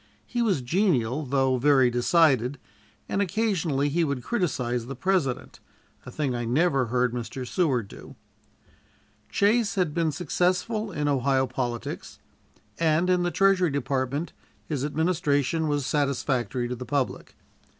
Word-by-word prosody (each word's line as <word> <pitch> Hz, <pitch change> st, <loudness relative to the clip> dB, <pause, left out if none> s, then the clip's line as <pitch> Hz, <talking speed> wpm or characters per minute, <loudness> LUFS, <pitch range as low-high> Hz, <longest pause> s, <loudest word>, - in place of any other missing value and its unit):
He 240 Hz, -, -2 dB
was 195 Hz, -, +1 dB
genial, 140 Hz, -, +1 dB
though 135 Hz, -1 st, +2 dB
very 135 Hz, -1 st, +4 dB
decided, 130 Hz, 0 st, +3 dB, 0.5 s
and 200 Hz, -, -1 dB
occasionally 180 Hz, -8 st, 0 dB
he 165 Hz, +4 st, +1 dB
would 140 Hz, -5 st, -2 dB
criticise 125 Hz, -, -1 dB
the 135 Hz, -, -6 dB
President, 160 Hz, -4 st, -1 dB, 0.5 s
a -, -, -7 dB
thing 140 Hz, -1 st, -1 dB
I 120 Hz, 0 st, -2 dB
never 135 Hz, +1 st, +2 dB
heard 125 Hz, +1 st, +1 dB
Mr. 125 Hz, +1 st, -5 dB
Seward 135 Hz, -, 0 dB
do. -, -, -12 dB, 1.1 s
Chase 210 Hz, +1 st, +2 dB
had 180 Hz, -6 st, 0 dB
been 165 Hz, -1 st, +1 dB
successful 185 Hz, +6 st, -1 dB
in 150 Hz, -4 st, -2 dB
Ohio 135 Hz, -1 st, +2 dB
politics, 120 Hz, -2 st, -4 dB, 0.6 s
and 165 Hz, +2 st, +2 dB
in 180 Hz, -1 st, +3 dB
the 175 Hz, -, +1 dB
Treasury 190 Hz, -1 st, +3 dB
Department 140 Hz, +2 st, -2 dB, 0.3 s
his 145 Hz, -4 st, -3 dB
administration 155 Hz, -1 st, 0 dB
was 145 Hz, -2 st, 0 dB
satisfactory 135 Hz, -4 st, -1 dB
to 125 Hz, -, -3 dB
the 125 Hz, -, -7 dB
public. 140 Hz, 0 st, -3 dB
145 Hz, 135 wpm, -26 LUFS, 125-175 Hz, 1.1 s, very